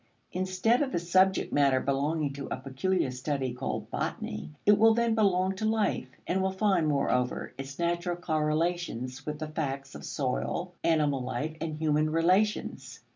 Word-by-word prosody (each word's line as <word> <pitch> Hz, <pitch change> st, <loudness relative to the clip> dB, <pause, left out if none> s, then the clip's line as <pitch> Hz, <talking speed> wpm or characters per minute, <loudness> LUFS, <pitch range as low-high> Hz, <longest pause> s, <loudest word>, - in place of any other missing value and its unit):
Instead 185 Hz, +7 st, +1 dB
of 275 Hz, -2 st, 0 dB
the -, -, 0 dB
subject 185 Hz, +3 st, +2 dB
matter 140 Hz, -2 st, +4 dB
belonging 140 Hz, +2 st, 0 dB
to 140 Hz, 0 st, -6 dB
a -, -, -2 dB
peculiar 135 Hz, +3 st, -1 dB
study 130 Hz, 0 st, -2 dB
called 125 Hz, +2 st, -4 dB
botany, 75 Hz, -, -3 dB, 0.2 s
it 205 Hz, -, +7 dB
will 225 Hz, 0 st, +6 dB
then 235 Hz, -1 st, +2 dB
belong 190 Hz, -3 st, +2 dB
to 200 Hz, -, -6 dB
life, 215 Hz, -11 st, +1 dB, 0.2 s
and 190 Hz, +2 st, 0 dB
will 190 Hz, -, +2 dB
find, 190 Hz, -4 st, +2 dB
moreover, 125 Hz, -4 st, 0 dB
its 135 Hz, 0 st, -7 dB
natural 175 Hz, +1 st, 0 dB
correlations 155 Hz, -5 st, -1 dB
with 150 Hz, 0 st, -2 dB
the 155 Hz, +1 st, -4 dB
facts 140 Hz, -3 st, -4 dB
of -, -, -9 dB
soil, 160 Hz, +6 st, -2 dB
animal 150 Hz, -5 st, +2 dB
life, 155 Hz, +5 st, -3 dB
and 160 Hz, -2 st, -2 dB
human 155 Hz, 0 st, +1 dB
relations. 185 Hz, +7 st, +1 dB
160 Hz, 160 wpm, -29 LUFS, 140-185 Hz, 0.2 s, it